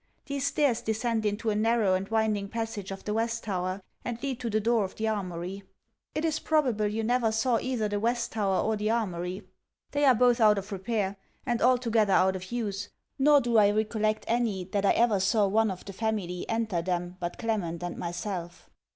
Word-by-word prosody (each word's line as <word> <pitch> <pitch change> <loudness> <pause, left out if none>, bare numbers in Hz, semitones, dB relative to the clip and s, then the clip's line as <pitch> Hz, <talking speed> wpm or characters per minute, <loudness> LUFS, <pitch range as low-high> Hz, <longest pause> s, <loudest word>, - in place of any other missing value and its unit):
These 280 -1 -2
stairs 265 -7 +1
descend 220 -1 0
into 215 +2 -1
a - - -1
narrow 220 -2 +2
and 190 +1 -1
winding 215 -3 0
passage 225 -3 -4
of 195 0 -7
the 210 - -2
West 230 +1 -1
Tower, 185 -1 -3 0.2
and 240 -1 -4
lead 265 -3 -2
to 240 - -3
the 215 0 +1
door 225 0 +2
of 190 - -5
the 220 - -2
Armoury. 190 -2 -3 0.5
It 310 - 0
is 315 -1 0
probable 255 -10 +1
you 220 +2 -2
never 235 0 +2
saw 225 +1 +1
either 250 -4 -1
the 205 0 -2
West 235 +2 0
Tower 200 -4 +1
or 220 - +1
the 210 +1 -1
Armoury. 185 -4 -2 0.5
They 290 0 +2
are 260 -2 +6
both 245 +1 +3
out 210 -1 +6
of 200 +2 -5
repair, 200 0 -2 0.3
and 240 -1 0
altogether 230 -5 +3
out 190 +1 +4
of 185 +2 -7
use; 205 -4 -3 0.3
nor 290 +1 +6
do 235 -2 +1
I 205 -1 +6
recollect 215 0 0
any 225 -5 0
that 200 -1 +1
I - - +6
ever 230 -4 +3
saw 205 +2 +3
one 220 +2 +2
of 185 -2 -6
the 195 - -7
family 195 -4 -3
enter 225 -6 0
them 175 0 -3
but 175 -1 -4
Clement 185 -7 -2
and 175 -1 -4
myself. 175 0 -5
215 Hz, 205 wpm, -28 LUFS, 195-230 Hz, 0.5 s, are